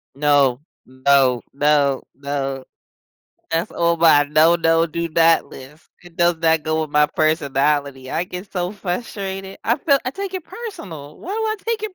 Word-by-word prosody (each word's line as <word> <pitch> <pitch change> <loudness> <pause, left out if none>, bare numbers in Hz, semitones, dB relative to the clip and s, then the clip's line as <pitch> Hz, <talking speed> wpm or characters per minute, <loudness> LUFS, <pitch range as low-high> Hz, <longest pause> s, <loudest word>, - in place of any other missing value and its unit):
No, 140 -3 +2 0.2
no, 130 -1 +2
no, 145 -1 +2
no, 135 -1 -4 0.9
that's 165 +1 -1
all 170 0 +1
mine, 150 -3 +4
no, 165 +2 +6
no, 165 0 +3
do 170 +1 -3
not 165 0 +3
list. 140 +5 -14
It 175 0 -16
does 175 -1 +3
not 160 -1 +2
go 155 +1 -1
with 155 - -6
my 150 0 +4
personality. 145 -3 0
I 175 - -1
get 180 +2 -9
so 180 -1 -2
frustrated. 195 -1 -5
I 235 +3 +2
feel, 280 -1 +3
I 255 - -1
take 385 +4 -6
it 365 - -5
personal. 175 - -9
Why 370 - -8
do 445 - -2 0.2
I - - -30
take 455 -2 -1
it 425 -3 -5
160 Hz, 170 wpm, -20 LUFS, 145-180 Hz, 0.9 s, no